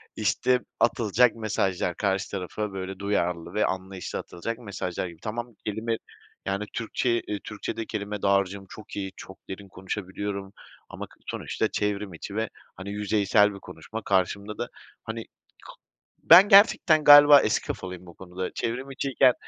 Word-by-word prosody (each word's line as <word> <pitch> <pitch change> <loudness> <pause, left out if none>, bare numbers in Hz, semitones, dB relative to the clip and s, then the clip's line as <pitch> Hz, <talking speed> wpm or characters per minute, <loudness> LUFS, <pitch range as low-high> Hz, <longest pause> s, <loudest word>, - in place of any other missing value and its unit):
işte 125 -1 +2 0.2
atılacak 120 +1 +3
mesajlar, 95 -5 -1
karşı 95 -2 -1
tarafa 100 +2 -4
böyle 95 0 -6
duyarlı 90 -3 -1
ve 105 - +2
anlayışlı 95 -1 -4
atılacak 115 +7 -5
mesajlar 95 -5 -4
gibi. 85 -2 -12
Tamam, 120 +1 -5
kelime 110 +2 -2 0.5
yani, 100 +2 -2
Türkçe'yi, 120 +1 0
eee, 105 - -3
Türkçe'de 110 +1 -5
kelime 105 -1 -5
dağarcığım 100 0 +1
çok 110 - -11
iyi, 95 -1 -4
çok 95 - -11
derin 95 +1 -7
konuşabiliyorum 95 +1 -5 0.4
ama - - -7
k - - -21
sonuçta - - -2
çevrim 105 -2 -2
içi 100 +5 -8
ve 110 0 -1 0.3
hani 95 +2 -8
yüzeysel 105 0 +2
bir 100 - -9
konuşma. 95 +7 -8
Karşımda 100 +2 0
da - - -3 0.4
hani, - - -5
k - - -33 0.9
ben 185 +5 +9
gerçekten 195 -5 +6
galiba 145 0 +10
eski 105 - 0
kafalıyım 90 -1 -6
bu 85 - -13
konuda. 90 0 -6
Çevrim 130 +4 -3
içiyken 135 -1 +3
100 Hz, 150 wpm, -26 LUFS, 95-115 Hz, 0.9 s, galiba